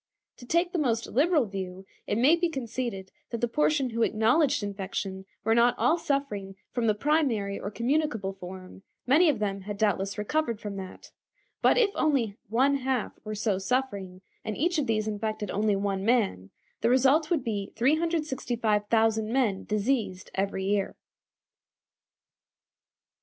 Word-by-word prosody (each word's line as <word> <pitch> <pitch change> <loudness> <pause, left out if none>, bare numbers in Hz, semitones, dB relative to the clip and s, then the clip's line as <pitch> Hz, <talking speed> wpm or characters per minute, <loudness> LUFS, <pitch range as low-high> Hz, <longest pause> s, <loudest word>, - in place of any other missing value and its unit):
To 245 - -13
take 340 +4 +2
the 355 - -1
most 230 -6 +1
liberal 300 +1 +2
view, 190 -2 -6 0.2
it 205 - 0
may 270 +8 +5
be 345 0 0
conceded 235 -8 -4 0.2
that 235 - -4
the 240 - +1
portion 280 0 +1
who 230 +1 -2
acknowledged 225 +5 +3
infection 195 -1 -4 0.2
were 225 - +3
not 235 +1 +4
all 340 - +3
suffering 210 -11 -2 0.2
from 240 -2 0
the 215 - +3
primary 230 -7 +1
or 200 - -4
communicable 235 -4 -1
form; 185 0 -10 0.2
many 310 +7 +5
of 285 - +1
them 200 -2 -2
had 205 +1 -6
doubtless 200 -1 0
recovered 235 +1 -1
from 205 -3 -6
that; 190 -1 -9 0.5
but - - +4
if 445 -5 +4
only 255 -9 +1
one 265 +5 +3
half 260 -3 -2
were 215 0 -5
so 205 -2 0
suffering, 195 -5 -2 0.2
and 215 - -4
each 340 +2 +1
of 290 - -1
these 215 -1 0
infected 215 -1 -3
only 210 0 +1
one 195 -1 -1
man, 200 - +1 0.3
the 230 - +3
result 270 +5 +4
would 320 -7 +1
be 205 -5 -3
365,000 230 -7 +1
men 235 -7 +1
diseased 210 -3 -1
every 195 0 -1
year. 200 0 0
225 Hz, 150 wpm, -28 LUFS, 200-270 Hz, 0.5 s, may